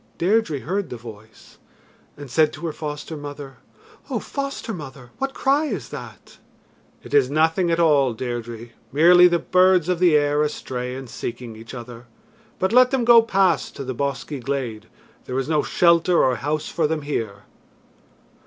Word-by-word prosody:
Deirdre 180 - +1
heard 195 +4 -3
the 125 - -6
voice 110 -1 -14 0.6
and 145 -3 -10
said 155 +1 +3
to 170 - -8
her 160 - -3
foster 150 +1 -6
mother: 145 -2 -8 0.5
"O - - -1
foster 275 -4 -5
mother, 135 - -10
what 270 0 -3
cry 280 +3 +2
is 200 - -4
that?" - - -11 0.6
"It - - -11
is 140 -3 +4
nothing 160 +4 +2
at 165 0 +1
all, 140 -7 +3
Deirdre 120 -1 -6 0.2
merely 175 +5 +7
the 175 -1 +2
birds 185 -1 +3
of 180 -2 0
the 175 -4 +4
air 145 0 +2
astray 125 -4 -3
and 135 0 -8
seeking 120 -1 -7
each 115 +3 -10
other. 120 0 -10 0.5
But 190 +4 -1
let 250 0 +6
them 255 -3 0
go 235 -1 +8
past 195 -6 +1
to 140 - -6
the 130 0 -4
bosky 140 +2 -3
glade. 125 -4 -4 0.4
There 130 - -4
is 135 - -1
no 155 -1 +2
shelter 170 +1 +3
or 130 -2 +2
house 150 +5 -2
for 160 -3 0
them 155 -1 -3
here." 110 -9 -4
150 Hz, 170 wpm, -22 LUFS, 125-175 Hz, 0.6 s, go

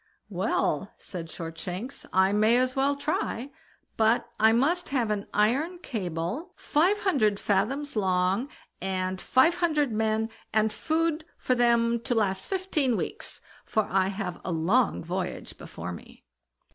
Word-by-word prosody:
"Well", - - 0
said 170 -3 -7
Shortshanks, 175 +8 -6
"I 190 +1 +4
may 215 +3 +4
as 255 0 +1
well 275 +1 +2
try; 280 -2 -2 0.5
but 225 +1 +3
I 220 +1 +6
must 310 +10 +2
have 245 -6 0
an 205 -1 -2
iron 270 - +1
cable, 200 - -4
five 355 +8 +2
hundred 215 - +2
fathoms 235 +8 0
long, 190 +4 +1 0.3
and 185 0 -2
five 320 +7 +4
hundred 305 -7 +1
men, 220 +1 0 0.2
and 215 0 +2
food 325 +2 0
for 255 - +1
them 235 -1 +3
to 245 +1 -2
last 195 -4 0
fifteen 345 - 0
weeks, - - -4 0.2
for 220 - +1
I 190 0 +3
have 195 -3 -4
a 185 - -3
long 180 +10 +2
voyage 180 +2 -4
before 85 +2 -7
me." 85 - -11
225 Hz, 140 wpm, -27 LUFS, 190-280 Hz, 0.5 s, I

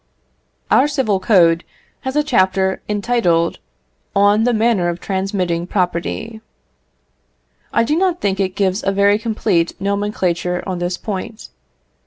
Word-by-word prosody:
Our 270 - +5
civil 260 -10 0
code 175 -5 +4 0.4
has 265 +1 -5
a 300 - +3
chapter 190 -8 +1
entitled, 205 -6 +1 0.6
"On 205 +2 +4
the 245 - +3
manner 220 -5 +2
of 170 0 -4
transmitting 190 -3 -2
property." 195 +5 -2 1.3
I 230 - +2
do 295 +6 0
not 360 0 +1
think 195 -1 -1
it 190 -1 -1
gives 195 0 0
a 195 - +1
very 200 +1 +3
complete 215 -7 -1
nomenclature 190 -3 -1
on 185 -2 -3
this 175 +1 -2
point. 215 +2 -6
200 Hz, 130 wpm, -18 LUFS, 180-225 Hz, 1.3 s, Our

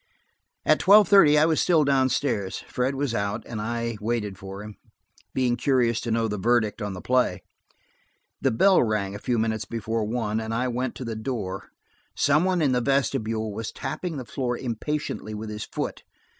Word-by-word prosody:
At - - +4
tweIve 205 0 +7
thirty 160 -7 +6
I 150 - +5
was 160 -1 +2
still 165 -4 +4
downstairs; 130 -7 0
Fred 130 +2 -1
was 135 -3 -1
out, 100 -2 -2
and 110 -3 -5
I 115 0 -3
waited 105 -3 -2
for 95 +1 -8
him, 105 0 -9 0.6
being 125 -2 +2
curious 120 -2 +1
to 115 - -4
know 115 0 +1
the 105 -2 -3
verdict 115 0 +1
on 105 -1 -3
the 90 - -8
play. 125 0 +1 1.0
The 135 - +3
bell 185 - +4
rang 105 -4 0
a 100 - -6
few 120 +2 -1
minutes 110 -1 -1
before 115 +1 -2
one, 110 -1 -1
and 110 0 -3
I 125 +2 0
went 125 +1 -2
to 130 - -6
the 115 -1 -4
door; 110 -5 -4 0.5
some 150 +4 +3
one 180 -3 +1
in 140 - +3
the 125 -1 +2
vestibule 115 -5 0
was 110 +2 -5
tapping 175 -4 -4
the 130 - -6
floor 120 -1 -2
impatiently 125 -2 -4
with 105 0 -6
his 105 0 -5
foot. - - -4
115 Hz, 185 wpm, -25 LUFS, 110-135 Hz, 1.0 s, tweIve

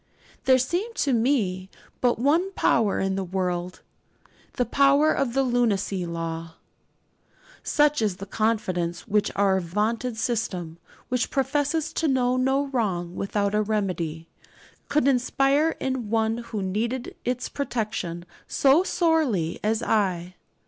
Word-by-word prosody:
There 260 -1 +6
seemed 355 - -2
to 275 - +1
me 220 -7 +1 0.3
but 245 -1 +2
one 320 - +2
power 220 - +2
in 195 0 0
the 195 - -1
world 180 -1 -3 0.7
the 245 - 0
power 280 +5 +4
of 265 -4 -1
the 270 - +3
lunacy 205 -7 0
'law.' 165 -1 -5 1.1
Such 295 -3 +2
is 210 -4 +1
the 195 - -7
confidence 190 -5 -1
which 210 0 +2
our 195 -1 +3
vaunted 220 +7 -1
system, 190 -8 -2 0.3
which 250 -2 0
professes 290 +4 0
to 325 - 0
know 255 -2 +2
no 265 +2 +1
wrong 185 -9 -1
without 200 0 -1
a 210 - +3
remedy, 180 -7 -2 0.6
could 285 -2 +2
inspire 275 +4 +2
in 260 -5 -2
one 225 +1 +1
who 210 -4 -3
needed 230 +7 -2
its 250 0 -2
protection 210 - -3 0.2
so 280 +4 +4
sorely 315 - +1
as 220 +2 0
I. 185 -6 0
225 Hz, 130 wpm, -25 LUFS, 190-270 Hz, 1.1 s, There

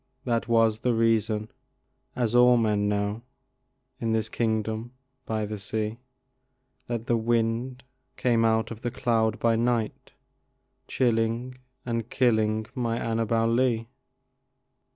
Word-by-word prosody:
that 115 -2 0
was 115 -2 +3
the 125 0 +1
reason 110 -1 +1 0.6
(as 120 -3 0
all 125 0 +6
men 105 -3 +1
know 105 +2 -1 0.8
In 115 -1 -1
this 110 -1 0
kingdom 110 +1 -2 0.3
by 110 -1 -1
the 105 0 -5
sea) 110 +3 -3 0.9
That 120 -1 -4
a 120 - +3
wind 115 +2 0 0.4
blew 120 -2 +2
out 110 0 +2
of 115 0 -8
a 120 - 0
cloud 115 -3 0
by 115 -1 +2
night, 120 -1 -1 0.7
Chilling 120 +1 0 0.3
and 115 -1 -2
killing 110 -3 +2
my 115 -2 -1
Annabel 115 0 0
Lee. 115 -1 +1
115 Hz, 120 wpm, -26 LUFS, 110-120 Hz, 0.9 s, all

